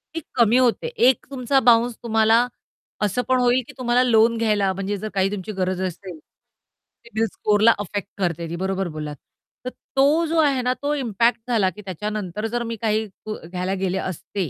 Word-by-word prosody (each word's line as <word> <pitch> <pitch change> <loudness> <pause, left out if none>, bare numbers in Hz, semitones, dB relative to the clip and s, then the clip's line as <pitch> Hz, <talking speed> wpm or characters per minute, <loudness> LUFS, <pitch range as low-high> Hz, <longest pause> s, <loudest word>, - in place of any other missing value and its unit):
ती 330 - -2
कमी 235 0 +4
होते. 255 - +2
एक 260 - +2
तुमचा 270 +1 +1
बाउन्स 235 -1 +4
तुम्हाला 225 +1 +3 0.5
असं 210 +4 +1
पण 255 -1 +3
होईल, 245 +1 +3
की - - -12
तुम्हाला 250 0 +2
लोन 230 -1 +4
घ्यायला 210 -4 +1
म्हणजे 195 +2 -3
जर 215 +2 -5
काही 195 0 +1
तुमची 205 +1 -5
गरज 185 -1 -2
असेल, 180 -1 -8 0.9
सीबील 225 -1 -1
स्कोररला 215 +2 +4
अफेक्ट 205 -1 -4
करते 170 -3 -2
ती, 170 - -4
बरोबर 190 +1 -2
बोललात. 150 -2 -6 0.5
तर - - -1 0.3
तो 290 +5 +4
जो 330 +1 -1
आहे 280 -4 +3
ना 250 +1 +1
तो 290 +1 0
इम्पॅक्ट 235 -3 +1
झाला, 220 -6 +2
की 200 +4 -11
त्याच्यानंतर 210 +1 -4
जर 240 +1 -2
मी 230 0 -4
काही 220 0 +1 0.2
ग 215 - -3 0.2
घ्यायला 185 +1 -2
गेले 190 0 0
असते, 185 -1 -4
220 Hz, 180 wpm, -22 LUFS, 190-245 Hz, 0.9 s, कमी